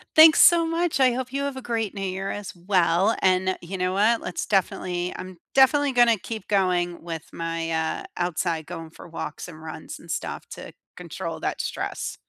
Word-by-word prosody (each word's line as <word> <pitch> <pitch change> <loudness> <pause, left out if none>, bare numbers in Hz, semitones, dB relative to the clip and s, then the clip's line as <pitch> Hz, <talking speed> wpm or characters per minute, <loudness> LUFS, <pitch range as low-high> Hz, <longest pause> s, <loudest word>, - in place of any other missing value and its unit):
Thanks 315 0 +9
so 340 -1 +7
much. 330 -2 0
I 255 -2 +5
hope 255 0 -4
you 275 +1 -2
have 280 -1 -3
a 265 - -6
great 225 -4 -2
New 200 - -6
Year, 195 0 -3
as 205 -4 -6
well. 180 +2 +2
And 185 0 +2
you 185 +3 -6
know 180 0 0
what? 215 +4 +3
Let's 180 - -4
definitely 180 -2 0
I'm 185 -1 -8 0.2
definitely 280 +1 +5
gonna 240 -2 +5
keep 220 +1 -7
going 180 -4 +1
with 165 -2 -6
my, 165 0 -3
uh, 160 0 -1
outside 170 -2 -1
going 165 -1 -7
for 160 - -13
walks, 160 -1 -6
and 160 -2 -11
runs, 160 -1 -8
and - - -16
stuff - - -4
to - - -9 0.2
control - - -6
that - - -2
stress. - - -4
185 Hz, 190 wpm, -25 LUFS, 170-235 Hz, 0.2 s, Thanks